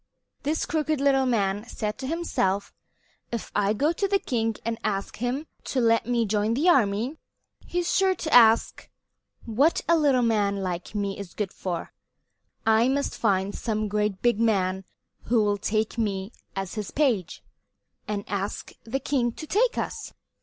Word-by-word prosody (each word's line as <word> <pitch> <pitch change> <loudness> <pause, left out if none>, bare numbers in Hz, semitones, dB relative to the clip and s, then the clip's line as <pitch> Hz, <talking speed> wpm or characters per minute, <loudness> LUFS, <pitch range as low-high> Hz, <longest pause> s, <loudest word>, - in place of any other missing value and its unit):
This 305 +3 -1
crooked 310 -2 0
little 270 -1 +3
man 205 -4 +1
said 210 -2 -4
to 260 - -4
himself: 235 - -1 0.6
"If 235 -2 -4
I 205 0 +2
go 290 +9 +2
to 395 +4 0
the 395 0 +3
king 225 - -1
and 230 0 -2
ask 195 -2 -2
him 250 +6 -2 0.2
to 265 - -1
let 230 -1 +3
me 240 -2 +1
join 210 +2 +1
his 300 +8 +1
army, 245 - +3 0.5
he's 350 0 -1
sure 380 -1 +3
to 315 -3 -4
ask 230 -2 +5 0.6
what 265 +9 +2
a 335 - +5
little 280 -6 +3
man 205 -3 +2
like 180 +2 -4
me 200 -1 -2
is 195 -3 -8
good 205 -3 -3
for. 175 -3 -4 0.7
I 225 +2 +4
must 280 +1 0
find 195 -2 +1
some 215 -2 -2
great 210 -1 -1
big 240 -3 +3
man 190 -4 +1 0.4
who 230 -1 +3
will 205 -1 +1
take 215 +3 -1
me 200 -2 -1 0.2
as 195 -1 -4
his 210 -3 -4
page, 240 - 0 0.6
and 205 -1 -3
ask 200 0 -4
the 250 +4 -2
king 260 -3 0
to 310 - -8
take 460 +9 +1
us." - - -4
225 Hz, 165 wpm, -26 LUFS, 205-270 Hz, 0.7 s, ask